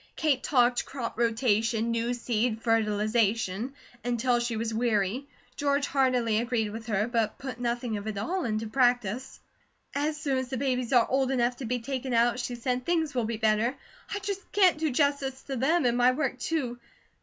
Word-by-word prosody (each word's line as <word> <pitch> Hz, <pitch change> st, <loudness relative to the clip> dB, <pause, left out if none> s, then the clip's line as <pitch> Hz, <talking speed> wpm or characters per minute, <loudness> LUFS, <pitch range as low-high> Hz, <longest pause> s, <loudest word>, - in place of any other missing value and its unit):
Kate 295 Hz, -5 st, +1 dB
talked 245 Hz, -3 st, +3 dB
crop 250 Hz, -4 st, -5 dB
rotation, 230 Hz, -1 st, +1 dB
new 230 Hz, +1 st, 0 dB
seed, 235 Hz, -1 st, -1 dB
fertilization, 220 Hz, +1 st, +1 dB, 0.3 s
until 245 Hz, 0 st, +1 dB
she 235 Hz, -1 st, -2 dB
was 225 Hz, 0 st, -2 dB
weary; 225 Hz, +2 st, 0 dB, 0.3 s
George 280 Hz, 0 st, +1 dB
heartily 250 Hz, -6 st, +2 dB
agreed 235 Hz, -3 st, -1 dB
with 225 Hz, +1 st, -7 dB
her, 210 Hz, 0 st, +1 dB
but 230 Hz, -3 st, 0 dB
put 260 Hz, -3 st, -6 dB
nothing 240 Hz, -1 st, -1 dB
of 205 Hz, +1 st, -6 dB
it 215 Hz, -2 st, -3 dB
all 350 Hz, -, -1 dB
into 220 Hz, -1 st, -1 dB
practice. 245 Hz, 0 st, 0 dB, 0.5 s
"As 300 Hz, +2 st, -1 dB
soon 280 Hz, -4 st, 0 dB
as 260 Hz, -, -3 dB
the 260 Hz, -, -3 dB
babies 250 Hz, -2 st, -1 dB
are 245 Hz, -3 st, +5 dB
old 265 Hz, 0 st, +1 dB
enough 245 Hz, -2 st, +1 dB
to 265 Hz, -, -6 dB
be 250 Hz, +2 st, 0 dB
taken 260 Hz, +1 st, -3 dB
out," 235 Hz, +2 st, +3 dB
she 245 Hz, 0 st, -3 dB
said, 250 Hz, +1 st, -2 dB
"things 320 Hz, -1 st, 0 dB
will 245 Hz, -3 st, 0 dB
be 225 Hz, 0 st, -3 dB
better. 220 Hz, +3 st, +2 dB, 0.4 s
I -, -, -1 dB
just 395 Hz, 0 st, -5 dB
can't 370 Hz, -6 st, +4 dB
do 315 Hz, -1 st, +1 dB
justice 275 Hz, -1 st, 0 dB
to 270 Hz, -, -4 dB
them 295 Hz, +5 st, +2 dB
and 240 Hz, -1 st, +3 dB
my 250 Hz, +1 st, +5 dB
work, 265 Hz, -2 st, -2 dB
too. 250 Hz, -6 st, -2 dB
245 Hz, 185 wpm, -28 LUFS, 225-270 Hz, 0.5 s, are